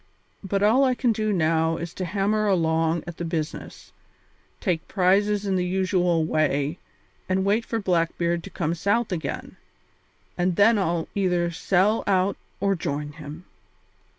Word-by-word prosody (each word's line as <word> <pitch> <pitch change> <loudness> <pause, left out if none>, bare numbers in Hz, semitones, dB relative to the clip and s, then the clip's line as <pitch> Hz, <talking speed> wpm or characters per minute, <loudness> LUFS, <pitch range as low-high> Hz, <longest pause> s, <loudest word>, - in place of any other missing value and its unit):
But 195 +1 -1
all 230 +6 +5
I 255 -2 +2
can 245 -1 +1
do 215 -1 -1
now 165 -2 +1
is 170 0 -6
to 185 - -4
hammer 210 +4 0
along 165 -3 +1
at 175 -1 -8
the - - -4
business, 165 -2 -5 0.7
take 175 -5 -1
prizes 200 +2 +2
in 195 -1 +1
the 180 - 0
usual 180 -2 +1
way, 155 0 0 0.5
and 190 +1 +1
wait 210 +4 +2
for 230 - -2
Blackbeard 170 -2 0
to - - -8
come 165 -3 -2
south 205 +7 0
again, 165 -3 -4 0.8
and 175 0 +1
then 210 +3 +5
I'll 170 -3 -1
either 180 -3 +1
sell 190 +5 +1
out 195 0 +2 0.2
or 195 0 +2
join 145 -3 -3
him." 155 +3 -10
180 Hz, 150 wpm, -24 LUFS, 165-200 Hz, 0.8 s, all